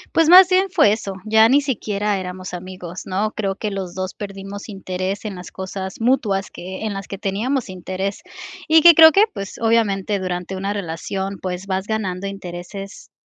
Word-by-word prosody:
Pues, 325 -1 +4
más 365 +1 +10
bien 375 +1 +2
fue 320 - +4
eso, 200 -3 -5
ya 220 +1 +5
ni 275 +3 +5
siquiera 210 -6 -1
éramos 185 -1 -6
amigos, 180 0 -7
¿no?, 205 +3 -1
creo 195 -2 -2
que 215 - -3
los 190 -3 -5
2 185 0 -4
perdimos 200 +1 -8
interés 190 0 -4
en 205 -3 -4
las 180 -1 -10
cosas 190 0 -6
mutuas 225 -5 +1
que 190 +4 -7
en 215 - -2
las 195 0 -7
que 195 - -5
teníamos 220 +7 -1
interés, 185 +2 -4 0.5
y 320 0 +7
que 340 0 +9
creo 320 0 +9
que, 400 +6 +5
pues, 195 -1 -6
obviamente 215 -3 +1
durante 180 0 -4
una 195 +1 -3
relación, 195 +1 -4
pues, 185 +1 -5
vas 190 0 -2
ganando 200 -3 -3
intereses 195 +1 -8
195 Hz, 180 wpm, -20 LUFS, 185-220 Hz, 0.5 s, más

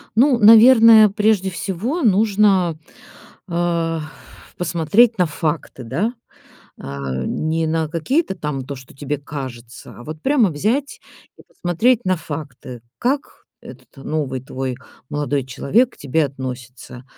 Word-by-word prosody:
Ну, 255 +1 +4
наверное, 225 0 +8
прежде 205 -2 +1
всего 200 - -3
нужно, 200 - +2 0.7
а, 170 -2 -1 0.6
посмотреть 180 +7 +2
на 180 - +3
факты, 155 -4 -4
да? 175 - -2 0.7
А 70 -1 -5
не 160 +1 -1
на 160 -1 -1
какие-то 190 - -1
там 150 -5 -4
то, 140 - -5
что 130 0 -15
тебе 145 +1 -4
кажется, 130 -5 -9
а 120 - -11
вот 155 0 -8
прямо 260 -8 +3
взять 225 - -2 0.4
и - - -15
посмотреть 215 +8 0
на 185 -1 +1
факты, 140 -6 -8 0.2
как 275 +3 -2 0.2
этот - - -14
новый 140 -5 -3
твой 130 -1 -4 0.4
молодой 145 -2 -2
человек 195 - 0
к - - -24
тебе 145 +3 0
относится, 125 -2 -9
165 Hz, 125 wpm, -19 LUFS, 140-215 Hz, 0.7 s, наверное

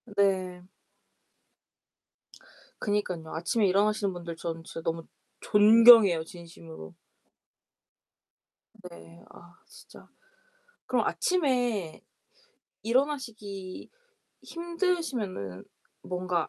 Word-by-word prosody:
네. 185 -2 0 2.1
그니깐요. 185 -6 -2
아침에 195 +6 +1
일어나시는 205 +1 +1
분들 170 -1 -7
저는 165 -1 -5
진짜 165 - -8
너무 165 0 -3 0.4
존경해요, 210 -4 +7
진심으로. 85 - -12 2.0
네 85 0 -15
아 175 0 -16
진짜 - - -16 0.8
그럼 - - 0
아침에 245 - 0 0.8
일어나시기 225 -7 -3 0.5
힘드시면은 330 - -3 0.4
뭔가 180 -2 -2
190 Hz, 180 characters per minute, -28 LUFS, 165-230 Hz, 2.1 s, 존경해요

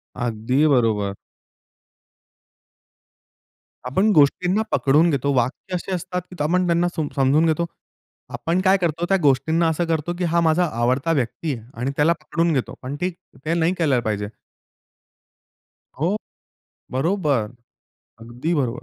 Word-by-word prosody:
अगदी 120 +4 0
बरोबर. 110 -7 +2 2.7
आपण 190 +12 +2
गोष्टींना 180 +6 +3
पकडून 150 +5 +3
घेतो. 140 -2 0
वाक्य 130 +9 -1
असे 180 +2 -4
असतात 180 +1 -4
की - - -9
आपण 180 +4 +2
त्यांना 170 +1 +2
सम 155 -3 -1
समजून 140 +4 +3
घेतो. 165 +1 +1 0.7
आपण 170 +3 -1
काय 190 +1 +5
करतो 170 0 0
त्या 195 - +4
गोष्टींना 160 +4 +2
असं 160 +2 0
करतो, 165 0 -1
की 180 - -2
हा 170 0 +2
माझा 165 +2 +3
आवडता 130 +7 +1
व्यक्ती 145 +2 -1
आहे 115 -2 -12
आणि 130 +3 -1
त्याला 155 +4 +3
पकडून 165 0 0
घेतो. 130 -4 -2
पण 130 +2 -5
ठीक 180 -1 -1 0.3
ते 160 - 0
नाही 170 +1 +2
केलं 145 -7 +2
पाहिजे. 105 -2 -2 1.7
हो, 175 +6 +1 0.8
बरोबर, 135 - 0 0.7
अगदी 120 +9 -3
बरोबर. 130 -5 -1
155 Hz, 135 wpm, -22 LUFS, 130-170 Hz, 2.7 s, काय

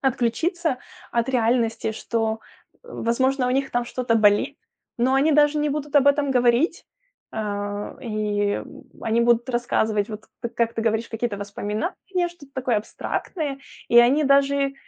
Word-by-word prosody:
отключиться 270 - 0 0.3
от 235 +1 0
реальности, 230 -3 +1
что, 225 0 -2 0.4
возможно, 260 - 0
у - - 0
них 270 +1 0
там 245 0 0
что-то 240 -1 0
болит, 215 +6 +3 0.4
но 255 +3 +2
они 285 +4 +3
даже 295 0 +4
не 300 0 +1
будут 295 0 -4
об 285 -1 +5
этом 285 0 +2
говорить. 250 +7 +2 0.5
Э, 205 -1 -4
и 210 -3 -1 0.4
они 225 +1 +1
будут 235 +1 +3
рассказывать, 220 -4 0
вот 215 0 -7 0.2
т 235 - -3
как 230 0 0
ты 225 - -2
говоришь, 225 0 0
какие-то 225 -2 -3
воспоминания, 215 - -3
что-то 290 -5 -16
такое 255 -3 0
абстрактное. 275 - -3 0.3
И 235 - +6
они 260 +6 +5
даже 275 0 +3
240 Hz, 145 wpm, -23 LUFS, 225-275 Hz, 0.5 s, И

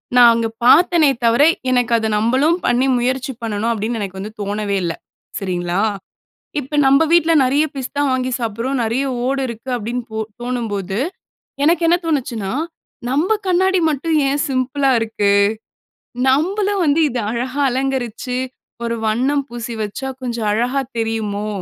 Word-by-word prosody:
நான் 240 -1 +8
அங்க 230 0 0 0.2
பாத்தேனே 325 +3 +5 0.2
தவிர, 235 +5 +4 0.3
எனக்கு 245 -1 +1
அத 220 -1 -1
நம்பளும் 260 +10 +2
பண்ணி 250 +2 +2
முயற்சி 255 +2 -1
பண்ணணும் 225 0 -1
அப்டின்னு 225 +1 -2
எனக்கு 190 -1 -5
வந்து 205 +3 -6
தோணவே 205 0 -2
இல்ல, 170 -1 -1 0.5
சரிங்களா! 180 -1 -1 0.8
இப்ப 290 +2 -4
நம்ப 275 +2 +5
வீட்ல 335 -1 +4
நிறைய 280 +4 +2
பிஸ்தா 270 +2 -3
வாங்கி 255 0 -1
சாப்பிட்றோம், 235 +4 -2
நிறைய 230 +4 0 0.2
ஓடு 270 +1 0
இருக்கு 235 +2 -8
அப்பிடின்னு 240 +2 -3
போ 220 - -4 0.2
தோணும்போது, 210 -6 -3 0.7
எனக்கு 335 +3 +3
என்ன 345 +1 +4
தோணுச்சுன்னா, 245 -10 -2 0.6
"நம்ப 330 +11 +1
கண்ணாடி 375 +1 +3
மட்டும் 310 +2 0
ஏன் 285 +1 0
சிம்பிளா 270 +1 +1
இருக்கு? 220 -3 0 1.0
நம்பளும் 385 +8 +1
வந்து 300 +1 +3
இத 245 - -3
அழகா 255 +4 -3
அலங்கரிச்சு, 255 -1 -2 0.5
ஒரு 235 0 -1
வண்ணம் 265 +6 +1
பூசி 240 0 -5
வச்சா 240 +6 -4
கொஞ்சம் 235 -3 -2
அழகாக 250 +5 0
தெரியுமோ" 215 -2 -2
250 Hz, 140 wpm, -19 LUFS, 225-280 Hz, 1.0 s, நான்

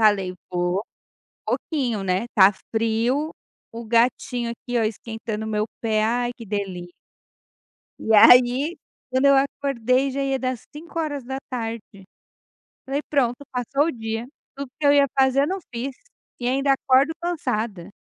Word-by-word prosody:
falei: 200 -4 +3 0.2
"Vou 180 +2 0 0.6
pouquinho, 245 -10 -1
né", 185 +3 0
está 200 -4 +5 0.2
frio. 230 +7 +1 0.4
O 235 0 -6
gatinho 235 +1 +1
aqui, 245 +1 -5
ó, - - +2
esquentando 220 0 -4
o - - -4
meu 210 0 0 0.2
pé, 215 -2 +1
ai, 240 +2 +1
que 235 - -9
delícia. 190 -4 -4 1.1
E 220 - -1
aí, 250 +8 +6 0.3
quando 260 +2 +2
eu 275 0 +6
acordei, 270 -1 +1
já 275 +1 -3
ia 270 -1 0
dar 255 -1 -1
as 250 -3 -7
5 330 +2 -8
horas 290 -4 -2
da 265 +1 -4
tarde. 230 -3 -3 1.1
Falei: 275 +2 -2
"Pronto, 265 -2 +1
passou 260 +3 0
o - - 0
dia". 225 -2 -4 0.3
Tudo 280 -1 -6
que 300 - -2
eu 285 - +6
ia 280 -1 +5
fazer 265 0 +4
eu - - 0
não 380 +3 -2
fiz 255 +3 -4 0.4
e 245 - -2
ainda 275 +2 +2
acordo 270 +3 +3
cansada. 230 - -2
245 Hz, 155 wpm, -23 LUFS, 220-275 Hz, 1.1 s, aí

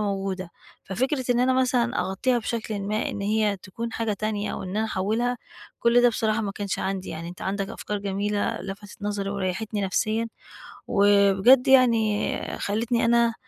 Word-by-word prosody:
موجودة. 195 -3 -2 0.3
ففكرة 260 +7 -1
إن 245 0 +3
أنا 255 +1 +3
مثلًا 250 -1 +1
أغطيها 240 +7 0
بشكل 220 -2 -3
ما 210 +2 -1
إن - - -5
هي 210 0 +1
تكُون 225 +5 -6
حاجة 225 -2 -1
تانية 210 0 -2
أو - - -5
إن 185 +1 -5
أنا 220 - +1
أحوّلها، 220 +5 -1 0.4
كُلّ 235 +1 +4
ده 245 - +7
بصراحة 220 -1 0
ما 205 -2 -3
كانش 200 -1 -3
عندي، 190 0 -3
يعني 165 +1 -6
أنت 180 - -9
عندك 195 0 -2
أفكار 210 - -4
جميلة 200 0 -1
لفتت 200 +3 -9
نظري 205 -1 -2
وريحتني 200 +2 -2
نفسيًا، 215 +4 0 0.6
وبجد 200 +6 +5
يعني 230 -5 +4 0.2
خلّيتني 230 +3 0
أنا 235 0 +3
210 Hz, 160 wpm, -25 LUFS, 195-235 Hz, 0.6 s, ده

